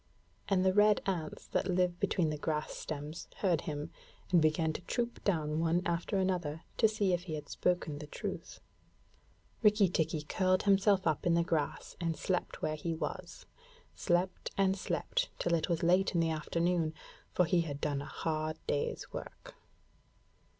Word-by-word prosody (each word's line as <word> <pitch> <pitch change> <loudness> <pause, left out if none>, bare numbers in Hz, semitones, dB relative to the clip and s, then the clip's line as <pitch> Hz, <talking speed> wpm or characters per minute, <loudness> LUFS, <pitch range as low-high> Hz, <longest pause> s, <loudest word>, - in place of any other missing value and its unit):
And 190 -2 +3
the 190 - +4
red 210 +1 +5
ants 170 -5 -3
that - - 0
live 180 -1 +1
between 165 -5 +1
the 150 - -3
grass 150 0 -1
stems 150 +2 -6
heard 175 -5 +2
him, 150 -1 -4 0.4
and 175 -2 +6
began 155 +1 +2
to - - -5
troop 235 +6 -3
down 155 -5 +1
one 165 +2 +2
after 170 +4 0
another 180 -5 -1
to 225 - +6
see 210 -3 +1
if 175 +1 -1
he 160 -4 -3
had 150 - -7
spoken 175 -5 -1
the 150 - -7
truth. - - -6 1.0
Rikki 210 -2 +5
tikki 160 -2 0
curled 185 +4 +1
himself 195 -1 +4
up 160 +1 +1
in 170 - +4
the 170 - +3
grass 155 -4 -2
and 165 -2 -1
slept 185 -2 -2
where 155 - +1
he 165 +2 -3
was 160 - -5 0.5
slept 175 +2 0
and 195 -1 +3
slept - - -1
till 170 - 0
it 165 +1 +1
was 170 -1 0
late 180 +2 +3
in - - +4
the 165 -1 +2
afternoon, 165 +1 0 0.4
for 180 - +3
he 170 +1 +3
had 145 -4 -4
done 145 -2 -1
a - - -6
hard 155 +1 -2
day's 145 - -2
work. - - -8
170 Hz, 170 wpm, -33 LUFS, 155-185 Hz, 1.0 s, and